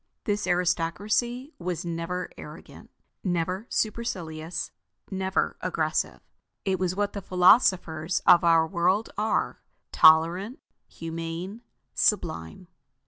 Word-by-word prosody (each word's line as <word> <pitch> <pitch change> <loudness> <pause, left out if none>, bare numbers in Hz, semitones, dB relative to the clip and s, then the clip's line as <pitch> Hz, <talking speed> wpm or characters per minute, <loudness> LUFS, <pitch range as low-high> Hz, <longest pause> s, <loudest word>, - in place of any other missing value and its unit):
This 205 -3 -1
aristocracy 200 - 0
was 175 -1 -3
never 170 +2 -4
arrogant, - - -12 0.3
never 185 +4 -1
supercilious, 170 -7 -3 0.4
never 190 0 -1
aggressive. - - -1 0.4
It 190 -2 0
was 185 -1 -1
what 205 0 -1
the 200 - -5
philosophers 180 -3 +3
of 175 - +7
our 165 -1 +5
world 185 +5 0
are: 215 +2 -1 0.3
tolerant, 170 +8 +5 0.3
humane, 165 +5 -6 0.3
sublime. 160 - 0
180 Hz, 95 wpm, -26 LUFS, 165-200 Hz, 0.4 s, of